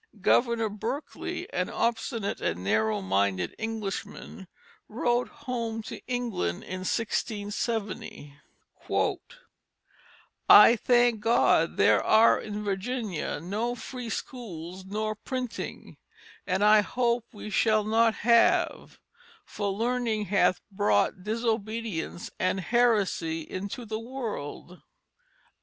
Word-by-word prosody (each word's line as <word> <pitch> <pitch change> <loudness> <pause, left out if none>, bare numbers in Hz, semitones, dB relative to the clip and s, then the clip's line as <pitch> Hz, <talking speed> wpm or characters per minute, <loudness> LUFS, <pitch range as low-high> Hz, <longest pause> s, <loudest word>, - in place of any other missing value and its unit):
Governor 235 +3 +2
Berkeley, 235 +8 -5
an - - -1
obstinate 230 -2 -2
and 85 +2 -2
narrow 105 +1 +1
minded 95 -1 0
Englishman, 215 -2 -5 0.4
wrote 240 +2 0
home 235 -6 -4
to - - -8
England 235 - -2
in 185 - -6
1670, 205 -5 -3 2.1
"I 220 +3 +10
thank 240 -1 +3
God 230 +3 +3
there - - +4
are 225 +1 +5
in 210 0 -5
Virginia 205 - -3
no 210 +9 -2
free 250 -1 -7
schools 185 - -6
nor 215 +2 -2
printing, 250 +2 -6 0.5
and 190 +1 +1
I 210 0 +7
hope 235 +2 0
we 210 -2 -8
shall 215 0 +3
not 225 +1 +3
have, 235 -1 +3 0.5
for 200 -1 -3
learning 230 0 -1
hath 185 -2 +2
brought 105 - +1
disobedience 220 -5 -3
and 185 +1 +1
heresy 205 -7 +1
into 200 +8 -6
the 220 0 -4
world." 225 - -6
215 Hz, 100 wpm, -27 LUFS, 190-235 Hz, 2.1 s, I